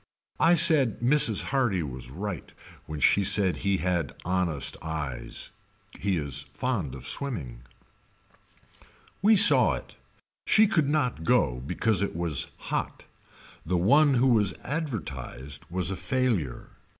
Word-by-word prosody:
I 170 +1 +4
said 155 - +3
Mrs. 120 -4 +4
Hardy 120 -10 0
was 65 -3 -8
right 90 +3 -7 0.4
when 75 -1 -6
she 100 - +3
said 100 -1 +3
he 100 -1 -1
had 90 -5 -2
honest 90 -6 -1
eyes. 75 -5 -6 0.5
He 95 -2 -1
is 70 -1 -4
fond 105 - -3
of 65 -1 -11
swimming. 75 - -4 1.6
We 215 +3 +5
saw 190 - +8
it. - - -11 0.5
She 220 - +5
could 160 -9 0
not 125 - -1
go 60 -5 +1
because 90 - 0
it 100 - -3
was 85 -4 -2 0.2
hot. - - -4 0.6
The 90 +2 -1
one 140 - +4
who 130 +2 +2
was 105 -5 +1
advertised 70 - -6
was 90 +1 -2
a - - -3
failure. 110 - -2
95 Hz, 130 wpm, -26 LUFS, -, 1.6 s, saw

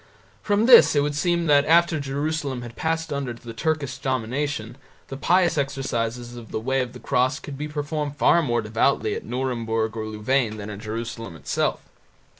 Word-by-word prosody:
From 205 +1 +2
this 240 -9 +8
it 145 - +4
would 145 +1 -1
seem 170 +3 +1
that 145 -2 +5
after 170 0 +4
Jerusalem 140 -1 -2
had 120 -1 -9
passed 160 -1 -2
under 140 -3 -3
the 115 0 -10
Turkish 140 0 -2
domination 130 -2 -2 0.3
the 135 - -5
pious 175 +2 +2
exercises 120 -3 -2
of 120 -2 -10
the - - -3
Way 130 +4 0
of 125 -1 -4
the - - -10
Cross 130 +1 +1
could 145 - -7
be 150 +2 -4
performed 150 -1 -3
far 170 - +4
more 120 -6 0
devoutly 110 0 +1
at - - -5
Nuremburg 115 -3 -2
or 110 -1 -4
Louvain 110 +1 0
than 105 0 -6
in 100 - -7
Jerusalem 115 -2 -5
itself. 75 - -1
135 Hz, 180 wpm, -24 LUFS, 115-150 Hz, 0.3 s, this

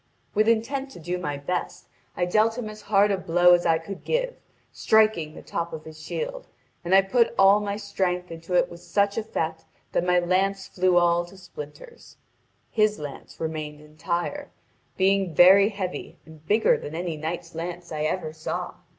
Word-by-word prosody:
With 215 +1 +2
intent 260 +5 +1
to - - -11
do 175 +2 -3
my 145 -5 -3
best, 180 +6 -4 0.3
I 175 - +1
dealt 215 +5 +2
him 230 -3 -4
as 215 0 -12
hard 205 0 +3
a 195 - 0
blow 175 0 +5
as 175 0 +3
I 165 - +4
could 185 +4 -8
give, - - -1 0.4
striking 215 -8 +2
the - - -11
top 170 0 -4
of 155 -1 -6
his 155 0 -11
shield, - - -5 0.4
and 180 +2 +3
I 195 - +7
put 235 +4 +2
all 195 +1 +6
my 205 -1 -3
strength 185 -4 -2
into 165 +2 -5
it - - +4
with 170 - -11
such 200 +3 0
effect 160 -7 -3 0.3
that - - +1
my 180 0 +3
lance 190 +2 +1
flew 185 -1 +2
all 175 0 +3
to 185 +3 -15
splinters. 180 - -11 0.5
His 215 -1 +2
lance 145 -2 -9
remained 155 -2 -4
entire, 170 - -4 0.5
being 190 -3 +2
very 195 +4 +7
heavy 195 -4 -5
and 160 -1 -15
bigger 220 +2 +4
than 150 - -7
any 170 -1 -3
knight's 165 +2 -5
lance 175 +1 -6
I 155 -1 -3
ever 155 0 -2
saw. 155 0 -5
180 Hz, 180 wpm, -25 LUFS, 165-205 Hz, 0.5 s, I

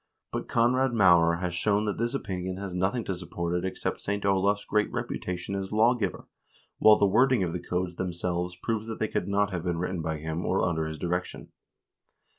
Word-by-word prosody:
1 - - -2
But - - -15
Konrad 125 +2 +2
Maurer 85 -5 +5
has 90 -1 -2
shown 105 +4 +1
that 105 - -2
this 120 +3 0
opinion 95 -6 -3
has 100 -2 -5
nothing 95 +6 0
to 95 - -2
support 85 -1 -4
it 90 - 0
except 95 - -3
St. 100 0 -2
Olav's 100 +1 +2
great 105 0 +1
reputation 90 +1 -4
as 95 -1 -3
lawgiver, 110 -3 +1 0.5
while 110 -1 +7
the - - +4
wording 120 +2 +4
of 85 -2 -2
the 90 - -2
codes 90 -1 -3
themselves 90 0 -2
proves 110 -1 -1
that 110 - -5
they 110 - 0
could - - -2
not 100 0 +1
have 90 -3 -3
been 85 -2 -1
written 90 0 -2
by 80 -1 -2
him 80 +3 -4
or 95 0 +1
under 80 -2 -1
his 80 0 -5
direction. 90 +2 -3
95 Hz, 205 wpm, -28 LUFS, 90-105 Hz, 0.5 s, while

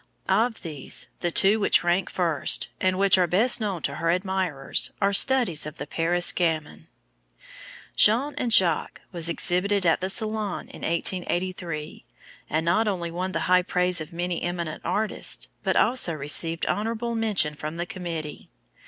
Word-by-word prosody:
Of 225 0 +1
these, 150 -6 -3
the 175 - -1
two 195 +5 +4
which 205 - +3
rank 175 +2 0
first, 170 -5 0
and 185 0 +1
which 195 -1 +4
are 180 - +3
best 220 +8 +2
known 195 -6 -3
to - - -3
her 165 - -1
admirers, 180 -5 -1
are 200 0 +1
studies 220 - +3
of 150 - -9
the - - -6
Paris 170 +4 +1
gamin. 160 -2 -2 1.1
Jean 250 +8 +4
and 240 - -2
Jacques 175 -7 +3
was 170 -2 +1
exhibited 185 +3 0
at 165 +1 +2
the 185 - -2
Salon 215 -1 -3
of - - -12
1883, 175 -2 -3 0.5
and 155 +2 -1
not 195 +7 +2
only 175 -4 -2
won 180 +2 -3
the - - -2
high 180 0 +3
praise 180 -1 0
of 155 - -8
many 175 0 -3
eminent 170 -3 -4
artists, 215 0 -1 0.2
but - - 0
also 230 -7 +2
received 155 +3 +2
"honorable 230 +2 -2
mention" 215 -9 0
from 155 +2 -7
the 175 - -2
committee. 170 -6 -7
180 Hz, 160 wpm, -25 LUFS, 165-200 Hz, 1.1 s, two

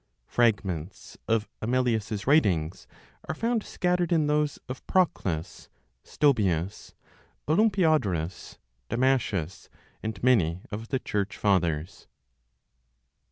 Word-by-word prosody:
(Fragments 100 -7 -1
of 110 -1 +1
Amelius's 110 -4 0
writings 95 - +2 0.4
are - - -1
found 230 +4 0
scattered 180 -3 -1
in 160 -3 +3
those 150 0 +1
of 130 0 -7
Proclus, 90 - -1 0.3
Stobaeus, 100 - 0 0.5
Olympiodorus, 155 - +1 0.3
Damascius, 115 - 0 0.3
and 110 +1 -5
many 95 -9 +3
of 110 +2 -5
the 130 - 0
Church 105 -4 -3
Fathers.) 90 -3 0
110 Hz, 90 wpm, -27 LUFS, 90-145 Hz, 0.5 s, in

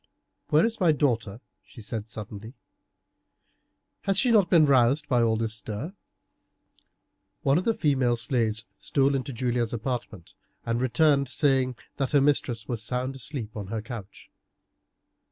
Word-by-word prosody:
"Where 155 +5 +5
is 230 0 -2
my 175 -5 +4
daughter?" 120 -7 0 0.2
she - - -16
said 110 0 -4
suddenly; 110 +2 -8 1.5
"has 195 -1 +2
she 245 +4 +4
not 205 -6 +4
been 165 -3 +6
roused 135 +2 +3
by 125 -2 +2
all 110 -1 +2
this 110 0 -2
stir?" 110 - -6 1.5
One 140 +4 +3
of 185 - -5
the 230 - +2
female 130 -6 +2
slaves 115 -2 -1
stole 140 0 +2
into 135 +1 -2
Julia's 120 -1 -1
apartment, 115 -6 -5 0.3
and 115 +1 -1
returned 140 +2 +3
saying 130 -1 +2 0.2
that 135 0 -2
her 145 - +6
mistress 125 -6 0
was 120 -3 -3
sound 125 +4 -3
asleep 130 -5 -6
on 105 -3 -5
her 110 +1 -4
couch. 115 -5 -9
125 Hz, 145 wpm, -26 LUFS, 115-145 Hz, 1.5 s, been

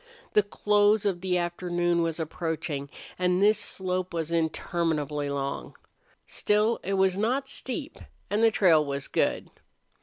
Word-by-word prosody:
The 210 - +6
close 205 +1 +2
of 185 -4 0
the 185 -1 0
afternoon 175 0 0
was 165 0 -1
approaching, 160 -3 -3 0.3
and 180 0 +2
this 210 +1 +4
slope 185 -3 -2
was 165 -1 -2
interminably 160 -3 -1
long. 140 0 -4 0.5
Still, 210 +2 +1
it 195 - -2
was 190 -1 +2
not 255 +6 0
steep, 270 +3 -3 0.3
and 210 +2 0
the 225 - +7
trail 175 -8 +4
was 140 -1 -4
good. - - -1
180 Hz, 140 wpm, -27 LUFS, 160-205 Hz, 0.5 s, the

